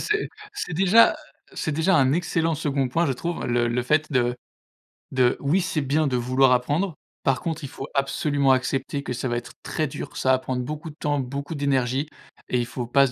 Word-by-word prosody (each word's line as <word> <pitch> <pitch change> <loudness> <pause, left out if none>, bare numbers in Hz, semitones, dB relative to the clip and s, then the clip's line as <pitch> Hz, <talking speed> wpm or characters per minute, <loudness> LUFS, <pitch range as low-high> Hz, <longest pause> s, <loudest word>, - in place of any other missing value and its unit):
C'est 425 0 0 0.2
c'est 290 - -4
déjà 195 - +6 0.4
c'est 155 - -2
déjà 160 +5 +3
un 135 -2 +4
excellent 165 -1 +1
second 140 -3 0
point, 165 +7 +1
je 135 - +1
trouve, 170 +7 -4
le 120 0 +1
le 120 +1 0
fait 155 +5 +1
de 125 -1 +2 0.8
de 125 -2 +3
oui, 145 +7 +2
c'est 170 -3 -1
bien 145 +3 +1
de 130 - 0
vouloir 130 +2 +3
apprendre. 145 +8 +1 0.3
Par 135 -2 +1
contre, 165 -2 -3
il - - -3
faut 135 - -7
absolument 140 0 +2
accepter 135 +2 -1
que 125 - -5
ça 125 +1 -2
va 120 - -1
être 120 - -6
très 155 -2 -1
dur, - - -7
ça 130 - +2
va 130 - +4
prendre 130 -1 -3
beaucoup 150 +5 -5
de 150 - -12
temps, 145 -1 -1
beaucoup 140 +4 -4
d'énergie 135 -1 0 0.4
et 125 - +1
il 120 - 0
faut 120 0 -5
pas 140 +2 +4
se 125 - -6
140 Hz, 215 wpm, -24 LUFS, 125-155 Hz, 0.8 s, déjà